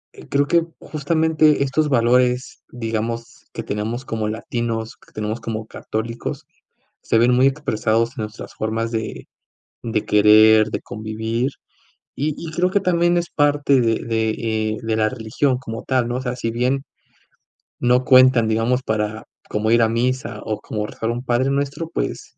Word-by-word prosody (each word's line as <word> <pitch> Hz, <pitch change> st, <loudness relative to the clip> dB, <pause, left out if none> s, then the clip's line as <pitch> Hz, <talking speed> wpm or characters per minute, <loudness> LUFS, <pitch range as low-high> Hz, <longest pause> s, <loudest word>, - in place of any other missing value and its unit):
eh, -, -, -13 dB
creo 140 Hz, 0 st, +2 dB
que 170 Hz, +1 st, +3 dB, 0.2 s
justamente 155 Hz, 0 st, +2 dB
estos 150 Hz, +3 st, 0 dB
valores, 125 Hz, 0 st, +2 dB
digamos, 115 Hz, 0 st, -4 dB
que -, -, -5 dB
tenemos 110 Hz, +5 st, -3 dB
como 110 Hz, -3 st, -2 dB
latinos, 115 Hz, 0 st, -3 dB
que -, -, -22 dB
tenemos 110 Hz, +2 st, -3 dB
como 110 Hz, -1 st, -4 dB
católicos, 115 Hz, +2 st, -5 dB, 0.6 s
se -, -, +1 dB
ven 120 Hz, +2 st, +4 dB
muy 130 Hz, +2 st, +5 dB
expresados 115 Hz, -5 st, 0 dB
en -, -, -3 dB
nuestras 105 Hz, +1 st, -8 dB
formas 110 Hz, +1 st, -2 dB
de 110 Hz, -1 st, -4 dB, 0.6 s
de 110 Hz, -2 st, -1 dB
querer, 110 Hz, +1 st, +6 dB
de -, -, -3 dB
convivir, 110 Hz, +4 st, -3 dB, 0.7 s
y 150 Hz, +2 st, 0 dB
y 165 Hz, -, -5 dB
creo 180 Hz, +3 st, +1 dB
que 200 Hz, -, +2 dB
también 175 Hz, -2 st, +2 dB
es 170 Hz, 0 st, -2 dB
parte 145 Hz, -2 st, +3 dB
de 115 Hz, -1 st, +2 dB
de, 110 Hz, -1 st, 0 dB
eh, 110 Hz, -1 st, -1 dB
de 110 Hz, -1 st, -1 dB
la 110 Hz, -1 st, +2 dB
religión 125 Hz, +2 st, -1 dB
como 115 Hz, -3 st, -7 dB
tal, 130 Hz, -3 st, +1 dB
¿no? 120 Hz, -, -2 dB
O 130 Hz, -, -3 dB
sea, 125 Hz, -1 st, -3 dB
si 115 Hz, -2 st, -2 dB
bien 125 Hz, +4 st, 0 dB, 1.0 s
no 125 Hz, +1 st, +3 dB
cuentan, 130 Hz, -3 st, +6 dB
digamos, 115 Hz, +3 st, +1 dB
para 110 Hz, -1 st, -2 dB, 0.2 s
como 110 Hz, +1 st, 0 dB
ir 115 Hz, 0 st, +5 dB
a 110 Hz, -, +3 dB
misa, 125 Hz, +3 st, -1 dB
o 110 Hz, -2 st, -2 dB
como 105 Hz, -1 st, -3 dB
rezar 115 Hz, -, -4 dB
un 120 Hz, +2 st, -4 dB
padrenuestro, 140 Hz, +5 st, 0 dB
pues -, -, -4 dB
120 Hz, 165 wpm, -21 LUFS, 110-135 Hz, 1.0 s, querer